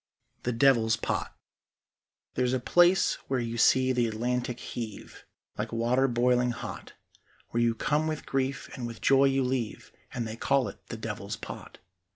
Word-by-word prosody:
THE 125 - -1
DEVIL'S 115 -2 +4
POT - - -2 1.0
There's 125 0 +1
a 130 - +1
place 175 +8 +4
where 135 -1 0
you 115 -1 -3
see 130 +2 +5
the 120 -2 +2
Atlantic 120 +2 -2
heave 110 -4 -7 0.3
Like 110 +1 -2
water 120 +3 +2
boiling 125 0 +2
hot; 120 - -6 0.6
Where 120 - 0
you 115 -1 +2
come 150 +5 0
with 155 -1 -3
grief 135 0 -1
and 120 -2 -4
with 115 -1 -8
joy 135 0 +5
you 135 0 +2
leave, 125 -4 -3 0.2
And 120 -3 -3
they 110 - -5
call 135 +1 +2
it - - -13
the 115 - -6
Devil's 105 -1 -5
Pot. - - -9
125 Hz, 165 wpm, -28 LUFS, 115-135 Hz, 1.0 s, see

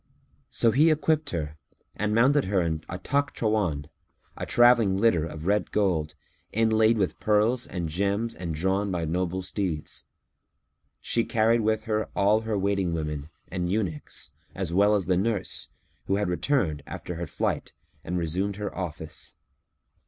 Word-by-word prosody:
So 115 - +3
he 150 +7 +5
equipped 155 -1 +1
her 75 - -4 0.4
and 105 +1 0
mounted 135 +5 +4
her 95 0 +1
in 80 -3 -1
a - - -4
Takhtrawán, 110 - 0 0.5
a - - -5
travelling 120 -5 +5
litter 95 -7 +3
of 80 0 -8
red 105 +2 +1
gold, 85 -7 0 0.4
inlaid 110 +1 +3
with 95 -4 -1
pearls 110 +4 +2
and 90 -2 -3
gems 100 +7 -1
and 85 -1 -5
drawn 95 +5 0
by 85 -3 -1
noble 90 +3 -1
steeds. 90 -5 -3 1.0
She 115 - +1
carried 115 +1 +2
with 110 0 +1
her 110 -1 -1
all 105 +2 +3
her 110 -2 -1
waiting 100 -3 0
women 75 -2 -3 0.2
and 90 -1 -2
eunuchs, 95 -8 -3 0.2
as 95 -3 -2
well 100 +3 +5
as 100 -3 0
the 90 0 +2
nurse, 100 -1 -1 0.4
who 95 - +2
had 105 -2 0
returned, 90 - 0
after 90 - -6
her 85 0 -4
flight, - - -2 0.3
and 90 +2 -2
resumed 90 +4 -1
her 105 -1 -5
office. 80 -4 -6
100 Hz, 150 wpm, -27 LUFS, 85-110 Hz, 1.0 s, he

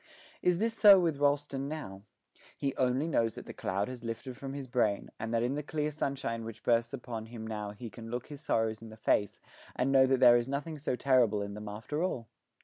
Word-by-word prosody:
Is 180 -1 +3
this 225 +4 0
so 205 -4 +8
with 165 -5 0
Rolleston 145 -1 +1
now? 140 -11 -6 0.6
He 135 -1 -2
only 130 +4 +1
knows 115 -8 +1
that - - -8
the - - -8
cloud 100 +2 -2
has 125 -2 -8
lifted 120 +3 -5
from 135 +2 -6
his 140 -2 -5
brain, 120 -5 0
and 110 +1 -4
that 115 0 +1
in 125 +3 0
the 150 - -2
clear 150 0 -2
sunshine 135 -6 -2
which 115 0 -8
bursts 115 0 +2
upon 120 -4 -6
him 115 -1 -8
now 105 -2 -4
he 105 +2 -8
can 115 +2 -9
look 120 +1 -3
his 145 -2 -10
sorrows 110 -7 0
in 115 - -9
the 110 - -12
face 105 -2 +1 0.4
and 130 +2 +1
know 135 -1 +6
that 130 -1 +2
there 120 -2 +8
is 120 +1 -1
nothing 145 +3 -3
so 135 - -1
terrible 120 -6 +3
in 100 0 -6
them 105 0 -7
after 115 +9 -4
all. 130 -11 -2
125 Hz, 230 wpm, -31 LUFS, 115-140 Hz, 0.6 s, so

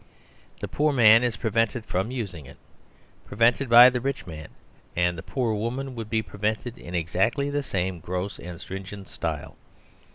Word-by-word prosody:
The - - -3
poor 150 +1 +1
man 115 -4 +7
is 120 -4 -1
prevented 115 +1 0
from 95 +3 -1
using 100 - -5
it; 70 - -14 0.7
prevented 115 +5 +2
by 120 +2 +9
the 125 -1 -2
rich 135 0 -3
man, 75 -3 -8 0.5
and 90 0 +1
the 80 - -7
poor 120 +1 -1
woman 125 +5 -3
would 115 -3 -6
be 110 -1 0
prevented 110 +4 -3
in 85 - -8
exactly 115 - 0
the 145 0 0
same 95 -8 -2
gross 90 +4 -4
and 85 -1 -8
stringent 95 0 -8
style. 80 -3 -5
110 Hz, 165 wpm, -25 LUFS, 90-125 Hz, 0.7 s, by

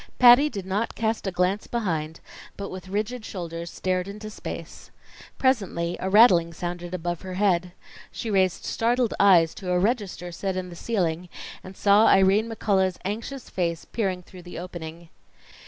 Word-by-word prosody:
Patty 250 +4 +8
did 200 -8 -6
not 200 +4 -2
cast 220 -2 -1
a - - 0
glance 180 +3 0
behind, 165 -9 -3 0.4
but 200 -1 -5
with 185 0 -8
rigid 215 +4 -2
shoulders 170 -4 -6
stared 185 0 -2
into 210 +2 -8
space. - - -8 0.5
Presently 195 -10 0
a 190 - -2
rattling 185 -6 +6
sounded 175 +1 -5
above 175 -1 -3
her 185 -1 -6
head. 180 -3 +1 0.4
She 225 - -4
raised 190 -2 +1
startled 240 0 +1
eyes 175 -5 +5
to 190 -3 -7
a 180 - +3
register 195 -3 -1
set 185 +2 -3
in 185 -1 -4
the - - -9
ceiling, 180 -4 -2 0.3
and 185 0 -11
saw 205 +2 +5
Irene 195 +4 +4
McCullough's 190 -5 +1
anxious 230 +6 -5
face 170 -3 -2
peering 190 -5 -2
through 180 +1 -13
the 175 0 -10
opening. 170 -1 -8
190 Hz, 160 wpm, -25 LUFS, 175-215 Hz, 0.5 s, Patty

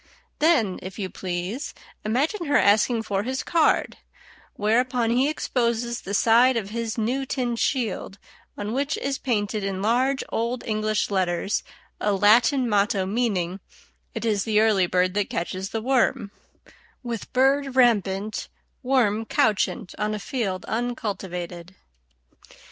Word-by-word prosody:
Then, 295 - +3
if 185 +2 -8
you 190 -3 -4
please, 185 - -4 0.3
imagine 295 - 0
her 290 - +4
asking 220 +3 +3
for 200 -2 -1
his 260 +5 -3
card, 330 -2 +2 0.6
whereupon 235 +2 +1
he 255 +4 +3
exposes 235 -5 -1
the 200 - -3
side 235 +4 +5
of 205 -3 -4
his 230 0 -3
new 245 +5 0
tin 250 -3 -2
shield, 230 -5 -1 0.4
on 205 +2 -4
which 280 +4 -1
is 275 0 -2
painted 210 -4 -1
in 195 -1 -2
large 255 +5 +2
Old 235 +2 -2
English 215 -1 -1
letters 185 0 0 0.4
a 210 - +1
Latin 225 +6 +4
motto 200 -2 +1
meaning, 195 -4 -1 0.6
"It 225 0 -3
is 210 -3 +1
the 215 -2 +2
early 210 -4 +3
bird 180 +1 +1
that 205 -1 -1
catches 185 +3 -3
the 225 -1 -4
worm," 245 -5 +1 0.7
with 235 -3 -5
bird 270 +1 +2
rampant, 215 -4 +2 0.3
worm 240 -5 +2
couchant 195 -5 0
on 210 0 -1
a - - -5
field 200 -4 -3
uncultivated. 190 -7 -4
220 Hz, 135 wpm, -24 LUFS, 200-250 Hz, 0.7 s, side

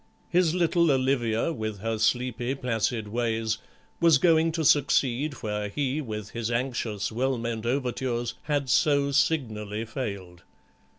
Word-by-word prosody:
His 175 -1 +2
little 170 -1 +3
Olivia, 130 0 +1
with 110 -6 -4
her 115 0 -2
sleepy 125 +2 0
placid 115 -3 -1
ways, 110 -1 -1 0.4
was 165 -4 +6
going 165 +1 +3
to 160 -1 -1
succeed 140 0 +2
where 105 -1 -2
he, 140 +6 -1
with 105 -5 -6
his 115 -1 -3
anxious 115 -4 -2
well 130 +3 0
meant 115 -1 -3
overtures, 125 -2 -1
had 145 -2 0
so 140 +2 +3
signally 110 -8 0
failed. 100 -7 -6
120 Hz, 130 wpm, -27 LUFS, 110-140 Hz, 0.4 s, was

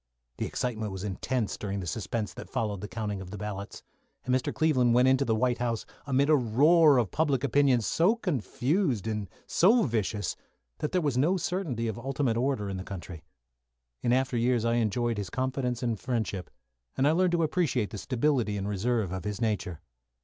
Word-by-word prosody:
The - - -2
excitement 110 -4 -3
was 95 0 -6
intense 105 +3 -2
during 100 -1 -3
the 95 - -5
suspense 105 +3 -3
that - - -9
followed 105 -4 -2
the 105 - -5
counting 105 -3 -4
of 95 - -8
the 105 - -7
ballots, 100 0 -6 0.4
and 125 - +1
Mr. 130 - +1
Cleveland 130 -7 +3
went 125 +1 +5
into 130 +1 +3
the 110 - +1
White 120 +1 +1
House 115 -2 -1 0.2
amidst 140 +2 +3
a - - +7
roar 145 +5 +5
of 115 -6 +1
public 145 -5 +1
opinion 140 -2 +3
so 175 - +2
confused 140 - -1
and 105 -3 -3 0.2
so 225 +7 +4
vicious 105 -4 -1 0.4
that 150 - -2
there 185 - +1
was 140 -5 0
no 170 +8 +3
certainty 165 - -2
of 110 0 -4
ultimate 135 -1 -1
order 120 -4 0
in 95 -1 -3
the 95 - -5
country. 90 -4 -8 0.8
In 120 - +1
after 130 0 +1
years 120 -1 +2
I 115 0 +2
enjoyed 115 +1 0
his 100 -3 -4
confidence 130 0 -2
and 115 -4 -1
friendship, 110 -7 -3 0.5
and 135 - +3
I - - +5
learned 180 +2 +2
to 170 -1 +2
appreciate 145 - 0
the 105 - -5
stability 120 -2 0
and 100 0 -3
reserve 105 0 0
of 95 -1 -4
his 105 -1 -4
nature. 105 -7 -2
120 Hz, 195 wpm, -28 LUFS, 105-135 Hz, 0.8 s, a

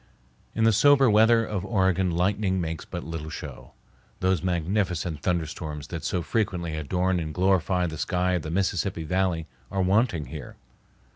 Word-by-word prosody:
In 115 - +1
the 115 0 +5
sober 135 +2 +5
weather 115 +2 +5
of 100 -4 -3
Oregon 95 -3 +1
lightning 95 +2 +1
makes 80 -2 -4
but 85 - -6
little 80 -1 -6
show. - - -8 0.5
Those 95 -1 +1
magnificent 90 -2 -1
thunderstorms 80 -3 -3
that 85 -3 -5
so 90 +2 -1
frequently 90 -5 -1
adorn 90 +4 0
and 80 -2 -4
glorify 90 0 +2
the 80 -3 -5
sky 90 -1 0
of 90 -2 0
the 75 - -6
Mississippi 90 -1 -1
Valley 90 0 0 0.2
are 95 -1 0
wanting 95 - +2
here. 75 -4 -8
90 Hz, 155 wpm, -26 LUFS, 80-95 Hz, 0.5 s, the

